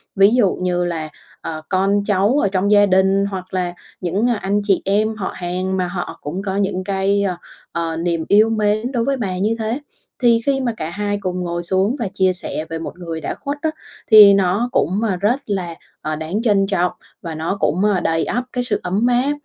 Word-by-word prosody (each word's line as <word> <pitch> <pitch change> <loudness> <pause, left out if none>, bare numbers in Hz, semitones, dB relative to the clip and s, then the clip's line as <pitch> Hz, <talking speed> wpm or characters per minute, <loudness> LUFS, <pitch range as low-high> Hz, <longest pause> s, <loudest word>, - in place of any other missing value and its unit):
ví 195 +2 +6
dụ 210 -7 +3
như 180 -1 -1
là, 160 -3 -3 0.3
ờ, 155 -1 -5
con 195 +2 +2
cháu 205 +5 +2
ở - - +2
trong 195 +1 0
gia 205 -1 +6
đình 190 +1 +3
hoặc 190 -2 -6
là 180 -2 -1 0.3
những, 195 +7 0
a, 240 - +2
anh 205 0 0
chị 200 -2 +2
em 215 +3 +1
họ 200 -3 -4
hàng 185 +1 -2
mà 180 -1 0
họ 175 0 -5
cũng 170 +6 -4
có 195 -1 -3
những 195 -2 -1
cái, 200 +1 +1
ơ, 185 -3 -1 0.3
ờ, 165 -1 -2
niềm 165 -1 -1
yêu 215 +2 +5
mến 215 +2 0
đối 240 -3 0
với 275 0 0
bà 190 -7 -3
như 210 +4 +1
thế. 225 +4 -2 0.4
Thì 235 -1 +5
khi 275 -1 +2
mà 240 -3 -1
cả 155 - -4
hai 205 +3 -2
cùng 185 -1 -2
ngồi 175 -1 -3
xuống 190 +7 +1
và 230 - -1
chia 185 -1 +2
sẻ 165 -3 -3
về 165 0 -4
một 165 - -7
người 165 -2 -5
đã - - -3
khuất 285 +1 -5
á 320 - +1 0.4
thì 210 -2 +10
nó 195 +5 +1
cũng, 190 +1 +1
a, 210 -5 +1
rất 210 +8 +1
là, 185 -5 -3 0.3
ờ, 155 0 -2
đáng 160 +7 -3
trân 205 -4 +2
trọng 180 -3 +1 0.3
và 165 -2 -6
nó 165 +5 -2
cũng, 180 +6 +1
ơ, 205 -3 +3
đầy 165 -1 0
ắp 245 +2 -1
cái 250 - -1
sự 220 -4 0
ấm 200 +6 +1
áp 250 +3 +2
195 Hz, 225 wpm, -19 LUFS, 180-215 Hz, 0.4 s, thì